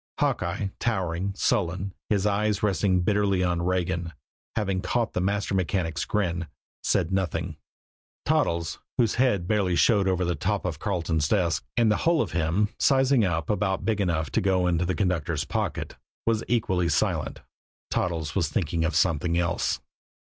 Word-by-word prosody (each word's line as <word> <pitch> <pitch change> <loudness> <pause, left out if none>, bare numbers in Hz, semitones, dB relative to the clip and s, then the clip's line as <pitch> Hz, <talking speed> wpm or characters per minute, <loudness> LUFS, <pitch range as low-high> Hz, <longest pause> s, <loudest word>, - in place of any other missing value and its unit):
Hawkeye, 100 - 0
towering, 95 -4 -1
sullen, 95 0 0 0.2
his 100 -2 +1
eyes 105 0 +1
resting 95 -2 +2
bitterly 100 -1 +2
on 90 -1 0
Regan, 90 -1 -1 0.4
having 95 -3 0
caught 120 +2 -1
the - - 0
master 100 +2 0
mechanic's 85 -2 -1
grin, 85 -5 -1 0.3
said 85 +1 +1
nothing; 85 -3 -1 0.7
Toddles, 85 -1 0 0.2
whose 115 -4 +3
head 100 -10 +2
barely 95 -4 +1
showed 100 +4 +4
over 90 -1 +1
the 90 - 0
top 100 +3 -1
of 80 -5 -3
Carleton's 85 -6 0
desk, 90 -6 +1
and 115 -2 +4
the 105 - +2
whole 170 -1 +2
of - - -7
him 90 +5 +1
sizing 135 -3 +4
up 80 -5 0
about 95 -2 -1
big 110 -2 +1
enough 80 -5 0
to - - +1
go 95 -2 +2
into 90 0 +1
the 95 - 0
conductor's 90 -6 0
pocket, - - -3 0.3
was 115 -1 +1
equally 95 -8 +1
silent 75 - 0 0.5
Toddles 80 -4 -1
was 85 -7 +1
thinking 80 +1 -1
of 80 -1 0
something 85 0 +2
else. 85 0 0
90 Hz, 155 wpm, -26 LUFS, 85-105 Hz, 0.7 s, showed